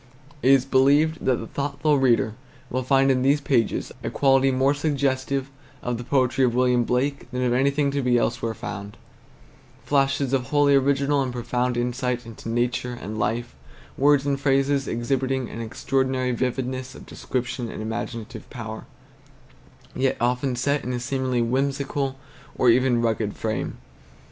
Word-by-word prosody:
It 130 - +3
is 135 -1 +5
believed 145 +4 +3
that 130 - +3
the 115 - -6
thoughtful 140 +3 0
reader 120 -4 +3 0.4
will 130 - 0
find 135 +1 +3
in 130 -1 +1
these 140 +3 +3
pages 130 -6 0
a - - -2
quality 135 -1 +3
more 135 +2 +2
suggestive 140 -2 -1 0.3
of 120 -1 -2
the - - -5
poetry 130 0 +1
of 120 -2 +2
William 125 -1 +3
Blake 135 +2 -1
than 125 0 -2
of 125 -1 +2
anything 140 +2 +2
to 140 0 -1
be 125 -1 +3
elsewhere 115 -1 -1
found, 105 -3 -7 0.9
flashes 140 -1 +1
of 130 -2 +1
wholly 145 0 +3
original 140 +1 +2
and 130 -2 -2
profound 125 0 -1
insight 125 0 -1
into 115 0 -9
nature 120 +1 -1
and 110 +3 -6
life; 115 0 -1 0.4
words 140 0 +3
and 140 -1 0
phrases 135 0 +2
exhibiting 130 +1 -1
an 115 - -6
extraordinary 130 +2 -1
vividness 130 +1 -3
of - - -11
descriptive 120 -1 -4
and - - -7
imaginative 110 0 -5
power, 110 -2 -7 1.1
yet 130 0 +1
often 125 +2 0
set 140 +3 0
in 125 - -3
a 125 - -2
seemingly 130 -1 -1
whimsical 135 +2 -1 0.4
or 125 - +5
even 120 -1 +2
rugged 110 -2 -1
frame. 110 - -3
130 Hz, 155 wpm, -24 LUFS, 120-135 Hz, 1.1 s, is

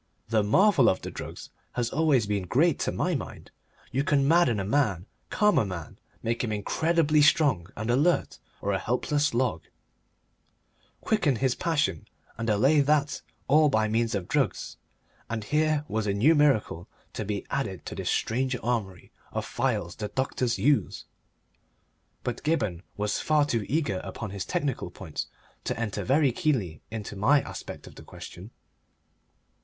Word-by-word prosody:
The 110 -1 +3
marvel 140 - +4
of 95 - 0
drugs - - -8 0.2
has 120 -1 -1
always 145 -8 +3
been 100 -3 -2
great 150 - +3
to - - 0
my - - -1
mind; - - -6 0.4
you 135 +2 0
can 140 -1 +2
madden 160 -9 +4
a 95 - -2
man, 105 - +1 0.2
calm 210 0 +3
a - - +2
man, 90 -4 -7 0.2
make 115 +2 -1
him 115 - -2
incredibly 155 - +2
strong 145 - +3
and 110 +1 -3
alert 150 +8 +1 0.2
or 100 - -1
a 95 - 0
helpless 145 +6 0
log, 120 -10 0 1.4
quicken 180 - +1
this 130 +2 +1
passion 150 - -1 0.3
and 115 0 -3
allay 135 +9 +4
that, 145 0 +1 0.3
all 150 +2 +5
by 110 -4 +2
means 115 0 0
of 95 -3 -3
drugs, - - -1 0.5
and 115 -2 -3
here 150 +3 +1
was 110 -3 -2
a 100 - 0
new 130 +11 +5
miracle 135 - +2 0.3
to - - -3
be 105 -1 -3
added - - -3
to - - -6
this - - -3
strange 130 +3 0
armoury 110 -7 -3 0.2
of - - -3
phials 85 +1 -1
the 105 - -3
doctors 125 0 -1
use! 145 +1 +1 1.2
But 125 -1 -3
Gibberne 105 - 0 0.2
was 105 0 -1
far 150 -1 +3
too 115 -8 -1
eager 140 - 0
upon 110 -4 -6
his 100 -1 -4
technical 140 -4 -2
points 85 -7 -6 0.4
to - - -2
enter 110 -4 -2
very 140 +1 +3
keenly 115 - -1
into 105 -2 -6
my 125 +9 +4
aspect - - -8
of - - -12
the - - -12
question. 95 +5 -10
120 Hz, 160 wpm, -27 LUFS, 105-145 Hz, 1.4 s, all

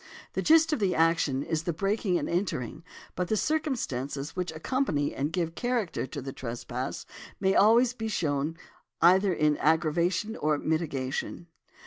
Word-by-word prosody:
The - - -1
gist 320 0 +5
of 300 - 0
the 195 -3 +1
action 160 -4 +2
is 160 -1 -1
the 170 +1 -2
breaking 195 +1 0
and - - -2
entering, 170 - -2 0.3
but 180 - -1
the 215 - +1
circumstances 155 - -2
which 180 -2 -2
accompany 160 - -1
and 145 +3 -2
give 165 -1 -1
character 240 - -1
to 140 0 -6
the 135 0 -6
trespass 125 +1 -5 0.3
may 190 -1 +2
always 235 +5 +5
be 225 -3 -4
shown 155 -5 -1 0.4
either 190 +3 +5
in 150 -3 +2
aggravation 170 +6 +1
or 150 -5 +1
mitigation. 150 -1 -2
170 Hz, 150 wpm, -28 LUFS, 145-205 Hz, 0.4 s, gist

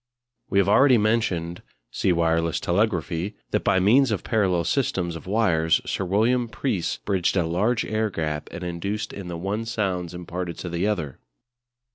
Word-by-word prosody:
We 100 - 0
have 100 - +4
already 135 -3 +6
mentioned 105 -6 0 0.3
(see 95 - +1
"Wireless 85 -1 +1
Telegraphy") 90 -1 -1 0.2
that - - 0
by 95 - +3
means 120 +8 +4
of 105 -4 -2
parallel 95 -6 +1
systems 90 - -1
of 80 - -9
wires 90 -6 +2
Sir 95 - -2
William 115 +6 +2
Preece 110 -8 -2
bridged 95 -2 0
a 85 - +2
large 105 +8 0
air 110 0 0
gap, 75 -5 -3
and 90 - -7
induced 90 +5 -3
in 100 -2 -7
the 85 -1 -5
one 100 +6 -2
sounds 95 -6 -2
imparted 90 0 -5
to 90 - -5
the 85 +4 -1
other. 85 -11 -2
95 Hz, 165 wpm, -24 LUFS, 85-110 Hz, 0.3 s, already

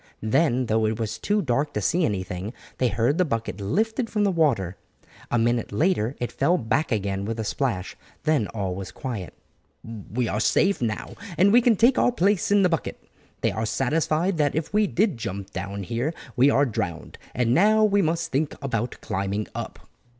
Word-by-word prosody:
Then 125 +2 +2
though 110 -1 +1
it 110 0 -1
was 110 -1 -3
too 205 - +1
dark 140 +2 0
to - - +1
see 170 - +2
anything, 95 +1 -3 0.3
they 125 - +3
heard 120 - +1
the - - +5
bucket 115 - -3
lifted 225 - 0
from 210 -2 0
the 200 - +3
water. 130 - +1 0.5
A 120 - +1
minute 120 0 +1
later 135 - +1
it 120 -1 -3
fell 170 +9 +2
back 135 +4 0
again 100 -3 -1
with 115 +2 -4
a - - -1
splash, 110 -4 -2 0.3
then 155 -9 +2
all 100 -4 -3
was 95 0 -6
quiet. 115 -9 -6 0.5
"We 115 +2 -4
are 105 - -1
safe 195 - +2
now, 110 -3 -3 0.2
and 200 +4 +5
can 235 -2 +5
take 235 +5 +4
our - - +4
place 205 -4 +1
in 200 -1 +4
the - - +5
bucket. 165 - -2 0.4
They - - +2
are 110 0 -2
satisfied 155 - 0
that 145 -1 +2
if 160 +4 -3
we 210 0 +3
did 190 - +1
jump 100 -3 -5
down 100 +1 -5
here 120 - -2 0.2
we 130 +2 +5
are 140 0 +4
drowned. 90 - -4 0.2
And 125 -1 +2
now 215 +6 +5
we 205 -1 +4
must 165 -1 -1
think 145 +2 0
about 120 -4 -3
climbing 100 +2 -2
up." - - -7
125 Hz, 190 wpm, -25 LUFS, 110-170 Hz, 0.5 s, the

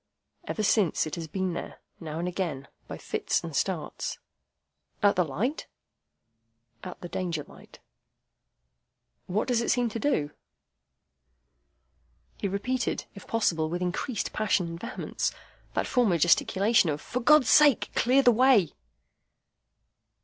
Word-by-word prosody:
Ever 215 - -2
since, 200 -4 +2
it 155 - -7
has 165 -1 -4
been 185 +2 -2
there, 170 - -7 0.2
now 155 -2 -6
and 175 +2 -2
again, 170 -7 -3 0.2
by - - -7
fits - - -2
and - - -6
starts." - - -2 0.9
"At 205 - +5
the 180 - +3
light?" 215 - -3 1.2
"At 180 - -8
the 175 - -6
Danger 170 -4 -3
light." - - -16 1.5
"What 195 +4 -1
does 245 -2 +1
it - - -2
seem 245 -2 +2
to 230 - -5
do?" 155 - 0 2.1
He - - -2
repeated, 230 +6 -2
if 200 - -12
possible 165 -8 0
with 175 +2 -2
increased 195 +6 -3
passion 205 -4 +1
and 170 0 -7
vehemence, 235 +6 -3 0.4
that - - 0
former 230 -9 +2
gesticulation 190 +4 +3
of, 145 0 -2
"For 250 - -4
God's 295 +1 +5
sake, 295 -5 +5
clear 260 +3 +3
the 245 - +7
way!" 235 - +4
195 Hz, 135 wpm, -27 LUFS, 170-240 Hz, 2.1 s, the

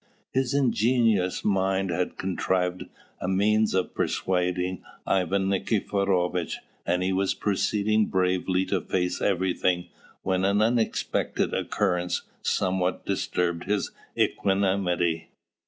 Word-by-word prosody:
His 130 0 +1
ingenious 115 -7 +2
mind 95 -1 +1
had 90 +2 -2
contrived 90 -1 -1 0.4
a - - -2
means 105 +3 +2
of 95 - 0
persuading 90 0 -1 0.2
Ivan 95 +1 +1
Nikiforovitch; 95 -3 0 0.3
and 90 +1 +1
he 95 +1 +1
was 95 0 +1
proceeding 105 +1 +1
bravely 95 0 +1
to - - 0
face 90 -1 -1
everything 90 -2 +1 0.3
when 95 0 0
an 100 +1 +3
unexpected 115 +1 0
occurrence 90 -3 0 0.2
somewhat 95 -1 0
disturbed 85 -1 -1
his 100 0 -1 0.3
equanimity. 95 -4 +1
95 Hz, 105 wpm, -26 LUFS, 90-100 Hz, 0.4 s, an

